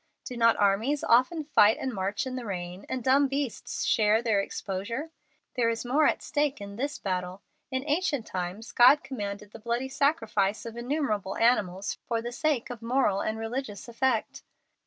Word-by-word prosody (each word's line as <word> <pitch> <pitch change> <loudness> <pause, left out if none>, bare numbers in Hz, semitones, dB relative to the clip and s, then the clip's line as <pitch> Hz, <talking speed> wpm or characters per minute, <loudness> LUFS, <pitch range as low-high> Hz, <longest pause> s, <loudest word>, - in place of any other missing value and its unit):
Do 250 - -6
not 230 -1 +4
armies 215 +9 +2
often 255 +7 +3
fight 220 -8 +4
and 260 -2 -3
march 200 +6 -2
in 255 -1 -4
the 255 - -4
rain, 180 0 -6
and 260 -2 -3
dumb 275 +3 +4
beasts 275 -3 -3
share 215 0 +3
their 220 -4 +2
exposure? 215 +11 -4 0.4
There 235 -3 +2
is 230 +1 -3
more 290 +5 +3
at - - 0
stake 290 -1 0
in 200 0 -8
this 275 +5 -3
battle. 185 0 -4 0.3
In 260 -1 -2
ancient 300 -5 0
times 185 +6 -5
God 250 +5 +6
commanded 205 -5 -6
the 225 - -11
bloody 235 +4 -2
sacrifice 225 -9 0
of 230 0 -7
innumerable 235 -6 -2
animals 200 -5 +1
for 230 -1 0
the 240 +1 -5
sake 265 -1 -1
of 240 -2 -8
moral 230 -4 +1
and 220 0 -2
religious 225 -2 -5
effect. 235 -1 -1
230 Hz, 175 wpm, -28 LUFS, 205-265 Hz, 0.4 s, God